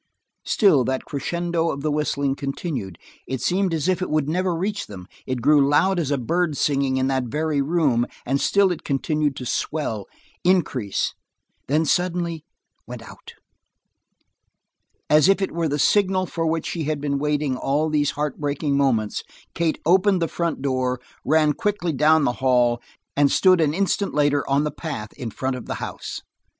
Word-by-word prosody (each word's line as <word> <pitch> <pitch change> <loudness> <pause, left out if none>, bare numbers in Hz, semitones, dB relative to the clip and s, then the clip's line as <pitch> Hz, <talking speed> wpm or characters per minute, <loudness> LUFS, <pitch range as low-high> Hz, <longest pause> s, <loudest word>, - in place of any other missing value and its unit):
Still 180 - +4
that 130 +1 -2
crescendo 170 +3 -1
of 140 - -3
the 155 - 0
whistling 145 -2 0
continued; 135 - -4 0.3
it 130 0 -3
seemed 185 - +1
as 160 0 -1
if 185 0 +1
it 185 - -2
would 155 -2 +1
never 180 +2 0
reach 200 +5 -2
them; 95 -3 -9 0.2
it 130 -3 -3
grew 145 -1 +5
loud 185 +6 +3
as 155 -5 -1
a 145 - +1
bird 160 +4 0
singing 135 -2 +1
in 130 - +1
that 130 -1 0
very 150 +4 -1
room, 140 -6 +1 0.2
and 135 +2 0
still 200 -2 +3
it 175 - -4
continued 145 +1 0
to 125 - -6
swell, 115 -7 -2 0.4
increase 150 - +1 0.5
then 155 +4 +2
suddenly 170 -1 0 0.4
went - - -8
out. - - -13 1.7
As 155 +4 +5
if 195 - +4
it 195 - -1
were 165 -1 -1
the 145 - -1
signal 190 +3 +2
for 165 -2 -2
which 160 0 -1
she 165 -3 -3
had 155 0 -1
been 140 -1 -1
waiting 150 -2 0
all 145 +4 0
these 150 -2 +1
heartbreaking 145 0 -1
moments, 120 -7 +1 0.3
Kate 165 -2 0
opened 190 +3 +4
the 165 - 0
front 170 -5 -3
door, 130 -2 0 0.2
ran 155 0 +3
quickly 205 -5 -1
down 155 +3 +4
the 125 - +1
hall, 120 -2 +3 0.3
and 140 0 +3
stood 185 -2 +5
an 150 -1 +1
instant 200 0 0
later 145 -1 +2
on 140 +2 +3
the 150 - -1
path 110 -10 -6
in 120 - -6
front 130 +4 -3
of 125 - -8
the - - -3
house. - - -6
150 Hz, 175 wpm, -23 LUFS, 135-170 Hz, 1.7 s, grew